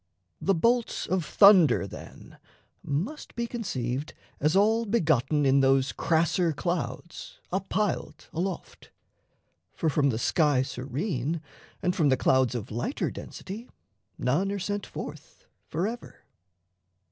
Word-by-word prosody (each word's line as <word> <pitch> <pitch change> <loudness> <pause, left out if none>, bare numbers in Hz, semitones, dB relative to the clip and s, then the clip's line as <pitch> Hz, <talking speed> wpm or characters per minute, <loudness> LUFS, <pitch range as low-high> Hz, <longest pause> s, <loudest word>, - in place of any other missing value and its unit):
The 195 - +2
bolts 235 +7 +1
of 185 -2 0
thunder, 180 - +6
then, 100 - -11 0.4
must 190 - -4
be 235 - -1
conceived 140 - -3 0.2
As 155 +4 +2
all 220 +4 +3
begotten 155 - +2
in 135 +1 +5
those 135 0 +3
crasser 165 +1 +1
clouds 160 -1 -4
Up 190 +1 -2
piled 210 -1 -2
aloft; 180 +2 -4 0.9
for, 160 - 0
from 140 -1 +2
the 110 - -1
sky 145 +1 +2
serene 140 - -3 0.4
And 180 - +1
from 150 -4 +3
the 130 - +3
clouds 130 -1 +3
of 115 -2 -5
lighter 120 - -2
density, 215 +6 -8 0.5
None 155 +11 +1
are 200 - -2
sent 205 +1 -3
forth - - -9 0.2
forever. 210 +9 -4
165 Hz, 125 wpm, -27 LUFS, 135-200 Hz, 0.9 s, thunder